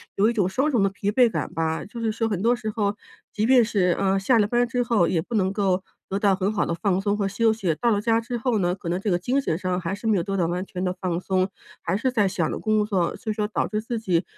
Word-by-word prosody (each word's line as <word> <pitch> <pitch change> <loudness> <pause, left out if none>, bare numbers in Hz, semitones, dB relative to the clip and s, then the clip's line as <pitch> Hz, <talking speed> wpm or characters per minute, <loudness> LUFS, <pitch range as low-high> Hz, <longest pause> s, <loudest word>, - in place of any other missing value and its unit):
有 205 +3 +3
一 235 - 0
种 200 -5 +1
双 270 +9 +1
重 235 - +2
的 195 - +3
疲 195 +1 -2
惫 245 +2 +4
感 - - -4
吧， 160 0 -1
就 230 +3 -9
是 225 -1 0
说 225 +1 -1
很 195 -3 -2
多 235 +2 +3
时 230 -3 -4
候 210 -2 -1 0.4
即 210 +1 0
便 250 -1 +6
是， 190 -6 +1
呃， 195 0 +2
下 230 +4 +3
了 205 - +3
班 240 +2 +2
之 245 0 -1
后 225 -7 +2
也 165 - +1
不 240 - -9
能 190 -2 +2
够 190 -2 +1 0.3
得 195 - -1
到 200 -2 +3
很 195 +2 0
好 205 - +1
的 - - -2
放 190 +2 0
松 205 +1 0
和 200 -2 0
休 225 +3 +2
息。 190 -7 -1
到 235 - +1
了 205 - +2
家 225 +1 +2
之 240 +1 -4
后 235 0 0
呢， 175 -1 +1
可 185 - -9
能 180 +2 0
这 205 - -1
个 175 - +3
精 250 +9 0
神 160 - -1
上 185 0 -1
还 170 +2 -3
是 205 - -12
没 215 -3 +3
有 170 - 0
做 195 +1 -3
到 175 - +2
完 180 +2 -2
全 185 -1 -5
地 180 -1 0
放 175 -2 -1
松， 185 0 0 0.3
还 175 +3 -1
是 255 +4 0
在 210 -5 +2
想 180 -3 -1
着 - - -3
工 215 -1 +1
作， 190 -5 0
所 220 - -4
以 - - -1
说， 210 -1 -1
导 210 - -1
致 215 0 -2
自 235 +1 -4
己 180 -5 +1
205 Hz, 325 characters per minute, -24 LUFS, 185-225 Hz, 0.4 s, 便